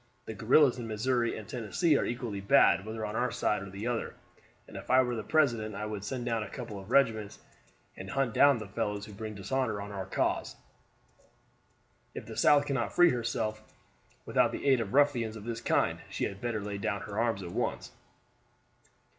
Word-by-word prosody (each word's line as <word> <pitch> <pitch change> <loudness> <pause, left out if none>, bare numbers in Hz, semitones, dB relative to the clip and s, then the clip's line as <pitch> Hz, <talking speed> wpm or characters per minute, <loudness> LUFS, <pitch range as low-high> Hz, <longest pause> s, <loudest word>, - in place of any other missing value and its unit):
The 110 - -6
guerrillas 125 +4 +4
in 115 - -5
Missouri 120 +2 0
and 110 -2 -9
Tennessee 140 - +1
are - - +2
equally 120 -5 -4
bad 100 0 +4
whether 110 0 -4
on 105 +1 -5
our 125 +2 +1
side 105 - 0
or 100 - -7
the 100 +3 -7
other, 120 -1 -2 0.5
and - - -14
if - - -8
I 130 +1 +6
were 125 -1 -2
the 110 - -3
president 115 -5 +1
I 105 - -4
would 105 -2 -5
send 120 +4 -4
down 115 -2 0
a 105 - -5
couple 115 -6 -7
of 95 +2 -12
regiments, 115 -6 +2 0.6
and 95 0 -8
hunt 135 0 0
down 140 +1 +5
the 110 -2 -7
fellows 105 -1 -3
who 105 - -11
bring 110 +1 -6
dishonor 110 +2 -1
on 100 +1 -6
our 95 -2 -5
cause. - - -1 1.6
If - - -6
the - - -9
South 145 -1 +5
cannot 130 -7 -2
free 175 -1 +6
herself 115 -3 -2 0.6
without - - +2
the - - -6
aid 130 -3 +4
of 110 +2 -4
ruffians 125 -6 +3
of 105 - -9
this 115 +1 -5
kind - - +1
she - - -4
had 100 0 -3
better 115 -3 -2
lay 100 0 -5
down 100 -1 -2
her 105 0 -5
arms 115 -4 0
at 85 - -7
once." - - -3
110 Hz, 200 wpm, -30 LUFS, 105-125 Hz, 1.6 s, I